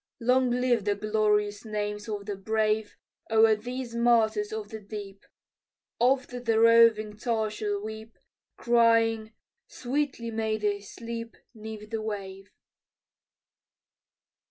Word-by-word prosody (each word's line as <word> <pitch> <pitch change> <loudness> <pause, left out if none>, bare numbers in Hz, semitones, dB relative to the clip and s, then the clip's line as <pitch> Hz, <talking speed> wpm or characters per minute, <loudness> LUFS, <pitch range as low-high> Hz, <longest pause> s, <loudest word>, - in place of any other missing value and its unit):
Long 250 +2 +3
live 245 -3 +1
the 205 -1 +1
glorious 210 0 0
names 210 -1 -4
of 205 -2 -4
the 205 -1 -4
brave 215 +1 -1 0.3
O'er 220 0 +5
these 245 +2 -6
martyrs 235 - +2
of 435 -1 -5
the 220 - -7
deep, 200 -1 -9 0.8
Oft 250 0 +1
the 225 -1 +2
roving 230 -2 +5
tar 220 -1 -1
shall 210 -1 -2
weep, 220 +1 -8 0.4
Crying, 230 -2 +3 0.3
"Sweetly 255 -2 -3
may 220 -1 -1
they 205 -1 -1
sleep 230 +3 -7 0.2
'Neath 215 -1 -9
the 225 -1 -2
wave." 195 -2 -6
220 Hz, 115 wpm, -27 LUFS, 210-235 Hz, 0.8 s, O'er